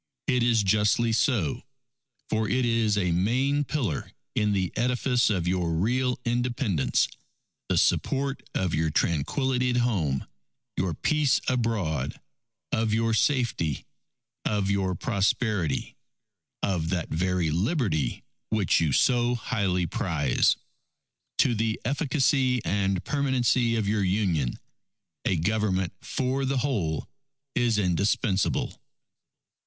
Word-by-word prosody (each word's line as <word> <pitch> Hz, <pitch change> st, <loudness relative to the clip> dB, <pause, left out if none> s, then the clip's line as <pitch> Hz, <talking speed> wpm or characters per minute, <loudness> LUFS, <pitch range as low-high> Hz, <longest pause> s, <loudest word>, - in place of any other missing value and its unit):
_ 130 Hz, -, +3 dB
_It 125 Hz, -, +2 dB
is 115 Hz, -3 st, +3 dB
justly 105 Hz, +4 st, +2 dB
so; 110 Hz, -, +1 dB, 0.7 s
for 110 Hz, -1 st, 0 dB
it 125 Hz, +2 st, +1 dB
is 115 Hz, -3 st, +2 dB
a 90 Hz, -3 st, +1 dB
main 130 Hz, +11 st, +1 dB
pillar 125 Hz, -, -2 dB, 0.2 s
in 105 Hz, -1 st, +1 dB
the 95 Hz, -3 st, 0 dB
edifice 125 Hz, 0 st, +1 dB
of 90 Hz, -5 st, 0 dB
your 90 Hz, -2 st, 0 dB
real 125 Hz, +8 st, 0 dB
Independence, 120 Hz, -, +1 dB, 0.6 s
the -, -, +2 dB
support 135 Hz, 0 st, +1 dB
of 95 Hz, -3 st, 0 dB
your 80 Hz, +1 st, +1 dB
tranquility 125 Hz, -, 0 dB
at 125 Hz, -, +1 dB
home, 90 Hz, -, 0 dB, 0.5 s
your 90 Hz, -3 st, -1 dB
peace 150 Hz, -, +2 dB
abroad; 105 Hz, -, -1 dB, 0.5 s
of 110 Hz, -1 st, +1 dB
your 115 Hz, +1 st, +1 dB
safety; 115 Hz, -, 0 dB, 0.6 s
of 100 Hz, -2 st, 0 dB
your 95 Hz, -2 st, 0 dB
prosperity; 100 Hz, -, 0 dB, 0.7 s
of 85 Hz, -5 st, 0 dB
that 85 Hz, -3 st, -2 dB
very 90 Hz, -1 st, 0 dB
Liberty, 95 Hz, -, 0 dB, 0.3 s
which 110 Hz, -4 st, +2 dB
you 80 Hz, -3 st, +1 dB
so 120 Hz, -, +3 dB
highly 100 Hz, -7 st, -1 dB
prize._... 80 Hz, -5 st, +1 dB, 0.9 s
_To 120 Hz, -, +1 dB
the 110 Hz, 0 st, -1 dB
efficacy 135 Hz, -2 st, +2 dB
and 95 Hz, +1 st, 0 dB
permanency 130 Hz, -4 st, +1 dB
of 110 Hz, -3 st, 0 dB
your 105 Hz, 0 st, +1 dB
Union, 90 Hz, -, 0 dB, 0.7 s
a 95 Hz, -, +2 dB
Government 95 Hz, +1 st, 0 dB
for 130 Hz, +1 st, -1 dB
the 135 Hz, 0 st, 0 dB
whole 110 Hz, -, -1 dB, 0.5 s
is 120 Hz, -3 st, +2 dB
indispensable. 100 Hz, +1 st, 0 dB
105 Hz, 115 wpm, -26 LUFS, 90-125 Hz, 0.9 s, _